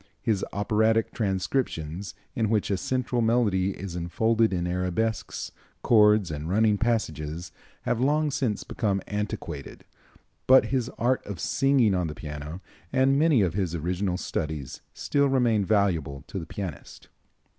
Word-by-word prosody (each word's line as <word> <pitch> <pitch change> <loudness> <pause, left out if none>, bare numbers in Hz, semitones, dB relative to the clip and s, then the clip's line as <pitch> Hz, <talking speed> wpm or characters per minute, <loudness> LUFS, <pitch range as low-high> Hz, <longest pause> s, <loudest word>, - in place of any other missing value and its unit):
His 105 -4 0
operatic 110 +2 +1
transcriptions, 95 - -2 0.2
in 110 -5 +1
which 105 -2 +1
a 100 - +1
central 125 +2 -1
melody 105 -5 +2
is 95 -2 -6
enfolded 110 +6 +1
in 90 -2 -1
arabesques, 90 +5 -2 0.3
chords 105 -5 +5
and 75 +1 -4
running 105 +1 +3
passages, 85 -8 -2 0.3
have 120 - 0
long 150 +2 +2
since 120 -7 -1
become 100 -4 -1
antiquated, 105 0 -5 0.6
but 130 +1 +7
his 125 -2 0
art 125 +2 +1
of 100 -5 -6
singing 135 -4 +3
on 90 -2 0
the 75 - -6
piano 75 +3 -7 0.3
and 135 +1 +3
many 150 -8 +4
of 90 -4 0
his 90 -3 -1
original 90 +3 -1
studies 75 -7 -4
still 140 -1 +1
remain 120 -6 +2
valuable 90 -9 0
to 95 - -5
the 80 - -7
pianist. 90 -7 -7
100 Hz, 140 wpm, -26 LUFS, 90-115 Hz, 0.6 s, but